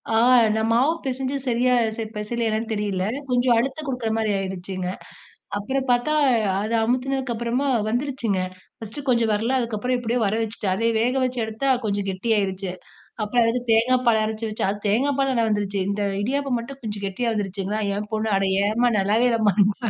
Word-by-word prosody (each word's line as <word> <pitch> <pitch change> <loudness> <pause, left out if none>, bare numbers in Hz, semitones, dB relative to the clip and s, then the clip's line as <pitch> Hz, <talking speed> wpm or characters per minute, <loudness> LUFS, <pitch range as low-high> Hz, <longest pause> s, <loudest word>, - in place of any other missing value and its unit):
ஆ. - - +4 0.4
நான் 220 0 0
மாவு 250 +7 +4
பிசைஞ்சு 265 +1 -2
சரியா 250 +1 +2 0.2
ச - - -9 0.2
பிசையலையான்னு 220 +1 -2
தெரியல, 205 -3 -1 0.3
கொஞ்சம் 245 -1 +3
அழுத்தம் 270 +6 -1
குடுக்கற 250 -4 -2
மாரி 220 -2 0
ஆயிருச்சுங்க. 185 -1 -4 0.7
அப்புறம் 265 +6 -2
பார்த்தா, 245 +5 +2 0.5
அதை 215 +3 -2
அமுத்தினதுக்கு 255 +1 -1
அப்புறமா 235 +4 -1 0.2
வந்துருச்சுங்க. 240 -5 -1 0.4
1ஸ்ட்டு 225 +6 -8
கொஞ்சம் 235 -3 +3
வர்ல. 225 +5 0
அதுக்கப்புறம் 235 +1 -1
எப்படியோ 240 +1 -1
வர 205 +1 +1
வச்சுட்டேன். 210 -3 -2
அதை 230 +4 +1
வேக 245 +3 +1
வச்சு 255 0 -2
எடுத்தா, 220 +5 -3 0.2
கொஞ்சம் 200 -1 -1
கெட்டியாருச்சு. 195 -2 -1 0.5
அப்புறம் 235 +3 +2
அதுக்கு 235 +2 +1
தேங்காய் 250 +3 +3
பால் 220 -2 +4
அரைச்சு 220 +1 -3
வச்சேன். 210 - -1
அது 205 - -5
தேங்காய் 265 +7 +2
பால்லா 270 -1 +2
நல்லா 230 -2 +2
வந்துருச்சு. 205 -2 -1
இந்த 205 +1 -1 0.2
இடியாப்பம் 270 +3 0
மட்டும் 270 +4 -8
கொஞ்சம் 205 -2 -4
கெட்டியா 230 +5 -1
வந்துருச்சுங்களா! 200 0 -2 0.2
என் 210 0 -5
பொண்ணு, 220 0 0
அட 195 - +1 0.2
ஏம்மா! 235 +3 +2
நல்லாவே 215 +5 +3
இல்லம்மானாங்க. 205 -2 +3
225 Hz, 165 wpm, -23 LUFS, 205-250 Hz, 0.7 s, ஆ